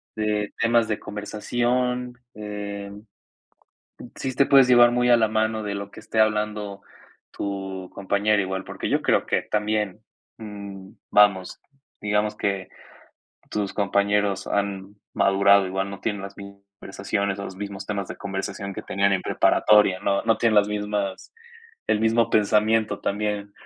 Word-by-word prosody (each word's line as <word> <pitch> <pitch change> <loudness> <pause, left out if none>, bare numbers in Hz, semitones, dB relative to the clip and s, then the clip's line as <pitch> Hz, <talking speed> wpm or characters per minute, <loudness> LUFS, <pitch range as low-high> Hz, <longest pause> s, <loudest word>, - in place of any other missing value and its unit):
de 105 -1 -1
temas 115 0 +3
de 105 - -2
conversación, 125 +4 -2 0.2
em, 105 0 -7 1.1
sí 130 -1 -4
te 140 - +3
puedes 135 -2 +6
llevar 120 -1 +7
muy 125 0 +2
a 120 - +7
la 110 -1 +3
mano 110 0 0
de 100 -1 -3
lo 100 0 -6
que - - -12
esté 110 - -5
hablando 105 -2 0 0.5
tu 95 -2 -5
compañero 100 +1 +1
igual, 95 0 -4
porque - - -5
yo - - +1
creo - - +2
que - - 0
también, 105 -1 -1 0.4
mm, 100 -3 -9 0.2
vamos, 100 -3 +3 0.4
digamos 105 0 0
que 100 -2 -2 0.8
tus 105 -2 -2
compañeros 100 0 +1
han 100 0 -2 0.2
madurado, 100 0 +4
igual 95 +1 -3
no 100 - -8
tienen 105 -3 -3
las 100 0 -9
mis 100 0 -10 0.3
conversaciones, 100 0 -3
o 100 - -5
los 95 - -8
mismos 100 0 -6
temas 100 -2 -3
de - - -7
conversación 100 0 -5
que - - -6
tenían 100 0 +1
en 95 - +1
preparatoria, 105 -3 +3
¿no?, 100 -1 0
no 115 -1 +2
tienen 115 -2 +2
las 105 0 +5
mismas 105 - -3 0.5
el 105 - +1
mismo 115 +1 +2
pensamiento 105 0 +2
también, 105 0 -2
105 Hz, 150 wpm, -24 LUFS, 100-110 Hz, 1.1 s, llevar